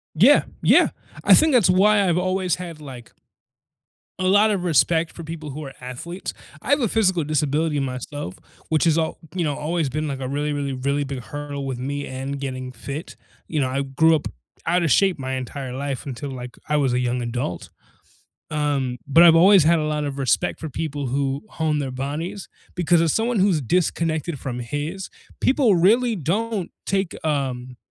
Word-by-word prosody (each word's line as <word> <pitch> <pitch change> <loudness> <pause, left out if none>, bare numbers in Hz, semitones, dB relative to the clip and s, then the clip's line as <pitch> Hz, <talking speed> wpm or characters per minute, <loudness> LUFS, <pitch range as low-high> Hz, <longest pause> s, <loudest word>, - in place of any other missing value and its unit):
Yeah, 245 - +6 0.2
yeah, - - +5 0.3
I - - +8
think 315 -1 +5
that's 230 -8 +5
why 200 +1 +4
I've 175 +1 +2
always 185 -1 0
had 170 -4 -8
like 130 -5 -11 1.1
a 185 - -1
lot 210 +2 +5
of 190 -3 -1
respect 165 0 +2
for 170 - -10
people 155 -2 -7
who 150 +2 -6
are 135 - -8
athletes, 130 +9 -6 0.3
I - - -5
have 285 0 +4
a 235 - +2
physical 190 -7 +1
disability 150 0 0
myself, 130 -4 -5 0.3
which 160 +1 +2
is 160 -1 +4
all 160 -1 -1 0.2
you 180 - -1
know, 145 -3 -1
always 160 -1 -1
been 155 +4 -2
like 135 -2 -4
a 130 - -3
really, 145 +2 -1
really, 140 -1 -2
really 140 +2 -1
big 135 -2 -4
hurdle 140 +3 -6
with 130 -2 -3
me 145 +2 -3
and 135 +2 -5
getting 130 -2 -5
fit, 140 +6 -7 0.3
you 155 -3 -1
know, 130 - +1
I 135 +2 -1
grew 155 +4 +3
up 150 - -1 0.4
outta 175 0 +2
shape 190 +3 +3
my 130 0 -4
entire 130 0 -5
life 140 0 -4
until, 135 +1 -5
like, 125 -1 -8
I 150 - +2
was 135 -4 +2
a 125 - +1
young 125 0 -1
adult, 120 -7 -4 0.8
um, 140 -5 -1
but 165 +5 +6
I've 165 -1 +8
always 185 0 +7
had 165 +1 +4
a - - -1
lot 150 -1 -1
of 140 -1 -4
respect 135 +6 0
for 160 - -5
people 145 -2 -4
who 135 +1 -1
hone 155 -2 -1
their 135 -2 -3
bodies, 150 +9 -4 0.3
because 175 -1 +3
as 165 -3 +2
someone 225 -1 0
who's 185 -5 +3
disconnected 165 +1 0
from 125 -2 -4
his, 145 +9 -4 0.3
people 260 -7 +4
really 225 +7 +3
don't 200 - -2 0.2
take, 195 -2 -1
um 130 -4 -2
150 Hz, 190 wpm, -22 LUFS, 135-175 Hz, 1.1 s, I